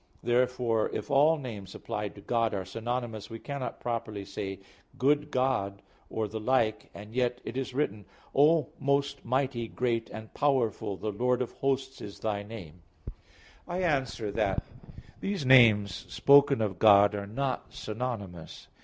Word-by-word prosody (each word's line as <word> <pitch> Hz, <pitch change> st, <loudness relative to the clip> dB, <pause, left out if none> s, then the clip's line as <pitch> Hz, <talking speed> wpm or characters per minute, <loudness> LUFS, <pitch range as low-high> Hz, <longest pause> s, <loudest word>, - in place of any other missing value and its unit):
Therefore 120 Hz, -2 st, +1 dB
if -, -, -4 dB
all 150 Hz, +4 st, +5 dB
names 105 Hz, -9 st, -7 dB
applied 105 Hz, -3 st, -4 dB
to 100 Hz, -, -11 dB
God 115 Hz, 0 st, 0 dB
are 95 Hz, -1 st, -3 dB
synonymous, 115 Hz, -2 st, -4 dB
we 115 Hz, -, -6 dB
cannot 140 Hz, +2 st, -5 dB
properly 115 Hz, -4 st, -3 dB
say 100 Hz, -1 st, -5 dB, 0.4 s
"good 145 Hz, +3 st, +2 dB
God" 125 Hz, -8 st, 0 dB, 0.3 s
or 110 Hz, -1 st, -2 dB
the 110 Hz, +2 st, -5 dB
like, 110 Hz, -2 st, +1 dB
and 105 Hz, +2 st, -10 dB
yet 125 Hz, 0 st, 0 dB
it -, -, -5 dB
is 130 Hz, -1 st, -3 dB
written, 105 Hz, -8 st, -1 dB, 0.3 s
"O 150 Hz, +1 st, +4 dB
most 140 Hz, 0 st, 0 dB
mighty, 130 Hz, -1 st, -1 dB
great 115 Hz, -1 st, -1 dB
and 110 Hz, 0 st, -9 dB
powerful, 120 Hz, -8 st, 0 dB
the 110 Hz, -, -3 dB
Lord 125 Hz, +4 st, +1 dB
of 120 Hz, -, -7 dB
hosts 135 Hz, -1 st, -2 dB
is 100 Hz, -, -8 dB
Thy 105 Hz, -2 st, -1 dB
name" 95 Hz, -6 st, -10 dB, 0.3 s
(Jer. -, -, -13 dB, 0.5 s
32:18). 175 Hz, -, -6 dB
I 185 Hz, -, -1 dB
answer 130 Hz, -, 0 dB
that, -, -, 0 dB, 0.6 s
These 195 Hz, -7 st, -2 dB
names 110 Hz, -7 st, +6 dB, 0.2 s
spoken 140 Hz, +4 st, +5 dB
of 100 Hz, -5 st, -2 dB
God 100 Hz, -1 st, +7 dB
are 100 Hz, -1 st, -4 dB
not 130 Hz, +5 st, -3 dB
synonymous. 105 Hz, -7 st, -6 dB
115 Hz, 155 wpm, -29 LUFS, 105-135 Hz, 0.6 s, God